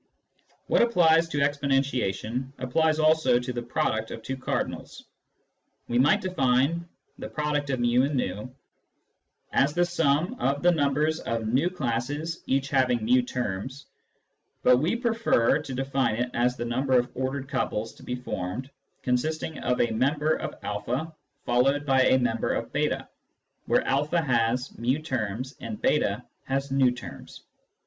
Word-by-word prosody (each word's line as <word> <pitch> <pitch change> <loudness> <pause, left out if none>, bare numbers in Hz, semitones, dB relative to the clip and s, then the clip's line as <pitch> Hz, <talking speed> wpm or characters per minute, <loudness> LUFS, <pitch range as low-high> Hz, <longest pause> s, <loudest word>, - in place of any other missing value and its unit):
What - - +3
applies 170 -7 +4
to 150 - -3
exponentiation 135 -4 0
applies 155 +5 +1
also 155 -4 +4
to 125 +1 -3
the 120 - -3
product 115 -2 -1
of 115 - -8
two 135 - -3
cardinals. 130 - -4 0.8
We 120 0 +1
might 145 +10 +4
define 165 -1 +1
" - - -32
fiXv" 130 -6 0 1.0
as 140 +2 +3
the 175 0 +3
sum 175 - +1
of 140 +3 0
the 175 - +6
numbers 150 0 +1
of 115 -1 -3
v 130 +10 +1
classes 145 +1 -3
each 135 +1 0
having 125 -4 +2
ju, 125 +2 +4
terms, 125 +2 -4 0.8
but 125 0 +6
we 160 - +1
prefer 230 - +2
to 140 -3 -7
define 135 -3 0
it 125 +2 -2
as 125 +1 +1
the 120 - -3
number 130 +2 +1
of 120 0 0
ordered 130 +1 -3
couples 110 -4 -2
to - - -18
be 125 - -3
formed 125 +1 -5 0.3
consisting 155 +5 -1
of 125 0 0
a 120 - +2
member 145 +7 +1
of - - -4
a 120 +10 -3 0.4
followed 135 +4 +2
by 135 -2 +4
a 130 - +5
member 120 -3 0
of - - -4
j3, - - -1 0.6
where - - +3
a 150 +5 +1
has 125 -1 +1
fi 120 +3 -1
terms 130 -3 -3
and 215 - -6
j8 120 -5 +1 0.2
has 135 +1 -2
v 135 -2 +3
terms. 125 0 -10
130 Hz, 145 wpm, -26 LUFS, 125-150 Hz, 1.0 s, the